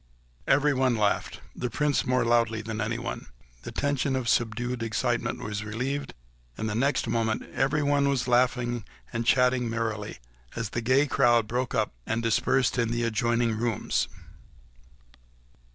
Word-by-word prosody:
Everyone 135 -3 +3
laughed—the 110 +3 -2
Prince 145 +3 0
more 125 -1 +2
loudly 115 -2 +2
than 110 0 -4
anyone. 120 +2 -3 0.3
The - - -7
tension 140 -1 0
of 130 -2 -2
subdued 120 +2 0
excitement 115 +1 -1
was 105 0 -3
relieved, 130 +6 -3 0.4
and 110 - -2
the 105 - -2
next 135 +6 +1
moment 110 -1 0
everyone 140 0 +2
was 135 -3 0
laughing 120 -1 +2 0.3
and 115 0 -2
chatting 125 -2 +3
merrily 110 -2 -3 0.4
as 115 -3 -3
the 120 - -2
gay 130 +5 +3
crowd 120 -5 +3
broke 125 +2 -2
up 110 - 0
and 115 +1 -1
dispersed 130 +2 +2
in 115 -1 +1
the 120 0 -1
adjoining 115 0 +1
rooms. 115 -1 0
120 Hz, 135 wpm, -27 LUFS, 115-130 Hz, 0.4 s, Everyone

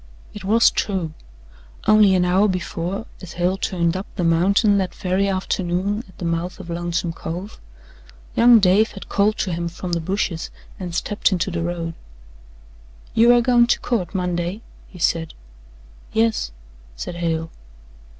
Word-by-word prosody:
It 205 - -9
was 225 +4 +4
true. 185 -6 -2 0.7
Only 210 -3 +6
an 180 -1 +3
hour 190 +4 +3
before, 185 +2 -3 0.2
as 185 -3 -9
Hale 180 +2 +1
turned 170 -3 0
up 190 +2 -4
the 180 - -1
mountain 200 +5 +3
that 185 -2 -2
very 190 +1 0
afternoon 190 +2 -1
at - - -19
the 175 - -5
mouth 170 +3 -2
of 175 -3 -8
Lonesome 170 0 -2
Cove, 180 +6 -6 0.8
young 235 0 +7
Dave 200 +3 +3
had 195 - -10
called 210 +2 +2
to 185 - -1
him 170 +1 -2
from 175 +1 -6
the 170 - 0
bushes 180 -1 -2 0.3
and 175 -3 -5
stepped 205 +4 0
into 185 0 0
the 170 -1 -2
road. 170 -1 -3 1.2
"You 235 +2 +6
air 240 0 +5
goin' 240 -1 +4
to - - +2
court 215 -5 -2
Monday?" 180 +2 -2 0.3
he 185 - -14
said. 165 -1 0 0.8
"Yes," 225 - +1 0.4
said 170 - -6
Hale. 165 -1 -2
185 Hz, 155 wpm, -21 LUFS, 170-205 Hz, 1.2 s, young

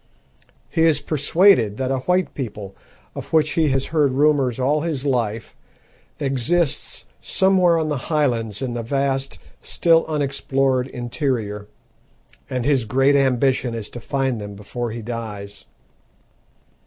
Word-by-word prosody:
He 165 - -1
is 160 -3 +4
persuaded 145 - +3
that 130 0 -1
a 135 - 0
white 180 +7 0
people, 105 -7 -6 0.4
of - - -8
which 155 -2 +3
he 160 -2 +2
has 135 0 0
heard 150 -3 +3
rumours 135 -3 +2
all 145 +4 +1
his 150 -4 -3
life, 115 -5 -1 0.6
exists 140 +4 -1
somewhere 185 -3 +3
on 160 -1 -1
the 150 - -1
highlands 120 -8 0
in 125 -2 -3
the 120 - -3
vast, 135 -1 -1 0.2
still 165 -1 +3
unexplored 135 -3 0
interior, 120 -5 -3 0.8
and 125 -2 -2
his 135 -5 +2
great 135 +5 +3
ambition 130 -2 +2
is 110 -3 -6
to 120 - -7
find 130 -2 -2
them 105 0 -7
before 115 +4 -5
he 115 0 -6
dies. 105 -3 -7
135 Hz, 135 wpm, -21 LUFS, 115-150 Hz, 0.8 s, is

